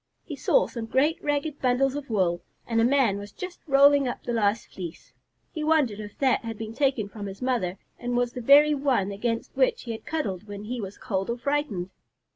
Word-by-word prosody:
He - - -7
saw - - +3
some 230 -3 -6
great 285 +7 +1
ragged 290 0 -1
bundles 255 +1 +2
of 285 -2 -6
wool, 180 -5 +1 0.2
and 230 -1 +1
a - - +4
man 240 -5 +3
was 205 0 -9
just 365 - -7
rolling 280 0 +6
up 245 - -4
the 240 - -3
last 215 0 +1
fleece. 170 -7 -8 0.4
He 310 - -4
wondered 300 -9 +2
if 210 -1 -8
that 265 -3 +2
had 225 -1 -5
been 220 0 -6
taken 265 -5 +1
from 205 0 -7
his 195 0 -8
mother 235 -8 -1 0.2
and 245 0 -2
was 245 0 0
the 250 - -5
very 290 +5 +7
one 270 -9 +1
against 230 +3 -3
which - - +2
he 235 - -5
had 220 - -8
cuddled 215 - -3
when 205 0 -7
he 240 +2 -4
was 195 0 -7
cold 195 -5 -2
or 235 - -1
frightened. 240 -9 -2
240 Hz, 215 wpm, -26 LUFS, 205-280 Hz, 0.4 s, very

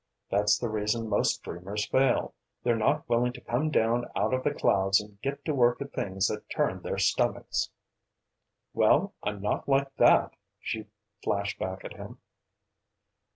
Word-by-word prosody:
That's 105 +1 +3
the 120 - -2
reason 110 +1 -1
most 105 - +1
dreamers 95 +5 -4
fail 130 -2 +2 0.3
they're 120 -1 +2
not 110 -1 +1
willing 120 +1 +2
to - - -10
come 135 +7 -1
down 120 -3 +1
out 105 +5 +1
of 130 0 0
the 145 - +2
clouds 95 -8 +3
and 105 0 -11
get 140 +2 -4
to 155 - 0
work 120 -3 +3
at 140 0 -7
things 95 0 0
that - - -5
turn - - -1
their - - -3
stomachs!" - - +1 1.0
"Well, - - +3
I'm 105 -1 -4
not 105 - -1
like 135 0 +2
that!" - - +5 0.3
she 110 -1 -4 0.4
flashed 100 0 -1
back 95 0 -4
at - - -6
him. - - -10
110 Hz, 160 wpm, -28 LUFS, 100-125 Hz, 1.0 s, that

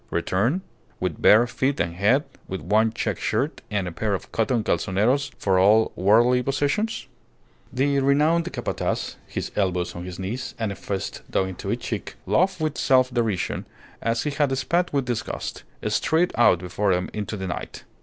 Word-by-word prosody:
Return? 120 - 0 0.4
With - - -3
bare 110 +3 +7
feet 130 +3 -1
and 85 0 0
head, 105 - +3 0.2
with 95 - -4
one 110 +4 +2
check 115 - -2
shirt - - -1
and 100 -3 -1
a - - -4
pair 100 +4 -1
of - - -8
cotton 115 0 +1
calzoneros 115 +10 +1
for 95 -2 +2
all 105 +4 +5
worldly 120 +6 +4
possessions? 145 - -1 0.7
The 140 +3 +1
renowned 155 +6 +2
Capataz, 120 - -2
his - - -4
elbows 90 -3 0
on 85 0 -6
his 90 -1 -7
knees 115 +7 -4
and 110 -3 -2
a - - -5
fist 95 0 -4
dug 95 0 0
into 95 - -5
each - - -2
cheek, - - -4
laughed 185 +1 +2
with 155 -1 -1
self 130 -1 +3
derision, 115 -6 -1 0.3
as 115 0 0
he 150 - -1
had 140 -2 +1
spat 170 +7 0
with 140 -2 0
disgust, 120 -2 -4 0.3
straight 165 +3 +2
out 120 -6 +5
before 90 +3 -1
him 90 +1 -1
into 105 0 -4
the 95 - -4
night. 90 - -5
115 Hz, 175 wpm, -24 LUFS, 95-140 Hz, 0.7 s, bare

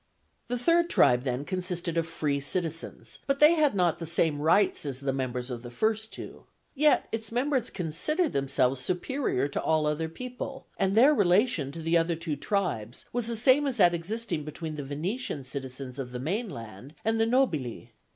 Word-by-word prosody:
The 245 - -1
third 335 +7 +3
tribe, 125 - +4
then, 130 +1 -2
consisted 180 -1 -3
of 165 -1 0
free 150 -3 -1
citizens, 165 +2 -2
but 275 0 +1
they 300 +2 +8
had 300 -7 +2
not 175 -4 +2
the 165 - -5
same 160 -2 +2
rights 185 +6 +3
as 135 -3 -4
the 135 -1 -1
members 125 -1 -3
of 120 -1 -5
the 120 - -8
first 220 - -1
two; - - -9 0.3
yet 300 +1 +3
its 225 -1 -4
members 255 0 0
considered 250 - 0
themselves 135 -1 +1
superior 180 - -1
to - - -2
all 155 -1 +2
other 150 +2 -1
people; 250 +7 -7
and 195 +1 +1
their 265 +7 +7
relation 185 - +2
to 165 - -7
the 165 +1 +3
other 165 +1 0
two 165 -2 -3
tribes 140 - -2
was 240 -2 0
the 235 - -1
same 260 +6 +4
as 260 -3 -2
that 175 -4 +5
existing 180 0 -3
between 155 +1 -6
the 145 - -5
Venetian 155 - -3
citizens 130 0 -7
of 125 -2 -5
the 125 - -4
mainland 135 - -5
and 225 0 +2
the 225 - +3
nobili. 155 - 0
170 Hz, 185 wpm, -28 LUFS, 140-230 Hz, 0.3 s, they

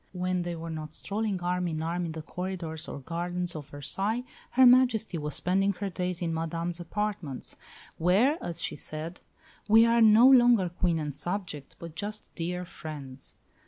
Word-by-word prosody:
When 180 0 -1
they 175 0 -3
were 165 0 -6
not 155 -1 -6
strolling 205 -2 -2
arm 180 0 0
in 160 -1 -2
arm 170 +1 -1
in 160 - -5
the 160 -1 -6
corridors 175 -3 -4
or 140 - -6
gardens 175 +3 -3
of 150 -2 -6
Versailles, 195 - -2 0.3
Her 260 +1 +5
Majesty 245 -7 +4
was 150 0 -4
spending 195 +2 +2
her 200 +1 -4
days 180 -1 -3
in 165 -1 -1
Madame's 165 +2 -3
apartments, 185 -5 -4 0.4
where, 210 - +3
as 170 -1 -4
she - - -1
said, 160 +3 -6 0.5
"We 225 +2 +7
are 230 0 +4
no 220 +3 +8
longer 240 -8 +6
Queen 175 -1 0
and 150 -3 -3
subject, 175 -5 -5
but 170 -2 -9
just 210 +4 -6
dear 180 +1 -3
friends." 145 -6 -9
175 Hz, 170 wpm, -29 LUFS, 160-205 Hz, 0.5 s, no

